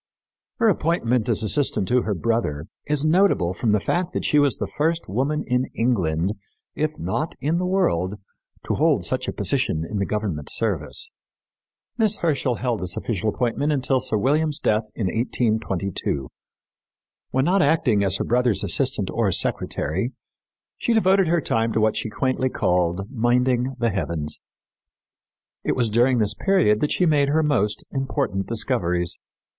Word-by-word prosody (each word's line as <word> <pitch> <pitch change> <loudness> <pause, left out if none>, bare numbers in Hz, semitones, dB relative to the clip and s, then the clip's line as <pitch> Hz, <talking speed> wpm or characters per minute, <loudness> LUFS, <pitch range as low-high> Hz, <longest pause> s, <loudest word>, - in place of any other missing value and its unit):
Her 230 - +2
appointment 135 - +1
as 110 -1 +1
assistant 130 -3 +1
to 125 0 +3
her 105 -3 -2
brother 90 -8 -1 0.2
is 150 0 +1
notable 155 - +3
from 115 +4 -2
the 105 0 +3
fact 175 - -1
that - - -2
she 150 - +3
was 145 -2 +2
the - - -2
first 165 +2 -1
woman 135 +9 -1
in 125 0 +1
England, 95 -6 0 0.4
if 155 0 -2
not 155 - -3
in 160 +4 0
the 180 - -1
world, 105 - +1 0.5
to - - -1
hold - - +2
such - - -2
a - - -1
position 80 +1 0
in 105 - -3
the 100 - -1
government 100 -9 -3
service. 115 - -1 0.9
Miss 220 -1 +2
Herschel 140 -6 0
held 120 -2 -2
this 90 0 -3
official 110 -1 -1
appointment 125 +7 -1
until 135 -2 +1
Sir 110 - -1
William's 150 +6 +1
death 110 +1 +1
in 110 - -2
1822. 100 - -1 1.0
When 130 +1 +1
not 190 +3 +3
acting 140 -9 +2
as 95 0 +2
her - - -1
brother's 120 -3 +2
assistant - - +1
or - - +1
secretary, 95 - -1 0.7
she 235 - +1
devoted 195 -4 +3
her 170 0 +2
time 115 -4 0
to - - +1
what 110 0 +2
she - - -2
quaintly 130 +4 0
called 90 -2 0
"minding 125 +1 +1
the 120 -2 0
heavens." 85 -6 -2 1.2
It - - 0
was 120 -3 0
during 120 +3 +3
this 105 -2 +2
period 155 - +2
that 150 - 0
she 180 - +2
made 145 -3 +3
her 160 +2 +2
most 115 -9 0
important 135 -7 -2
discoveries. 90 -7 0
120 Hz, 160 wpm, -23 LUFS, 105-150 Hz, 1.2 s, to